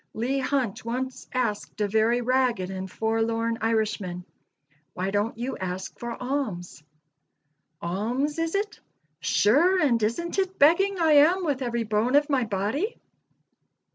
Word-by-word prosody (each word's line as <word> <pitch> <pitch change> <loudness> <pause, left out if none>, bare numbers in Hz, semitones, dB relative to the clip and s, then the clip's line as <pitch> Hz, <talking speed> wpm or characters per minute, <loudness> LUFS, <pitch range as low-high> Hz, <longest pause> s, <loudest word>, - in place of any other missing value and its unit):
Leigh 255 +5 0
Hunt 260 -6 -1
once 255 +3 -4
asked 235 -5 -2
a 210 - +1
very 220 +4 +2
ragged 245 -6 +1
and 190 0 -5
forlorn 225 +2 -1
Irishman, 210 -5 -1 0.7
"Why 185 +2 -2
don't 205 +3 -1
you 250 +3 -3
ask 185 0 -5
for 240 0 -4
alms?" 250 - -3 1.0
"Alms, 240 - -1
is 330 +2 -1
it? 410 +1 -2 0.4
Sure 335 - +3
and 245 -8 +2
isn't 340 - -1
it 380 0 -1
begging 380 +7 +4
I 325 -2 +3
am 325 +6 +5
with 280 -4 -1
every 235 -2 -1
bone 220 +4 +1
of 295 +1 +3
my 260 -4 +2
body?" 220 - -2
235 Hz, 140 wpm, -26 LUFS, 210-285 Hz, 1.0 s, am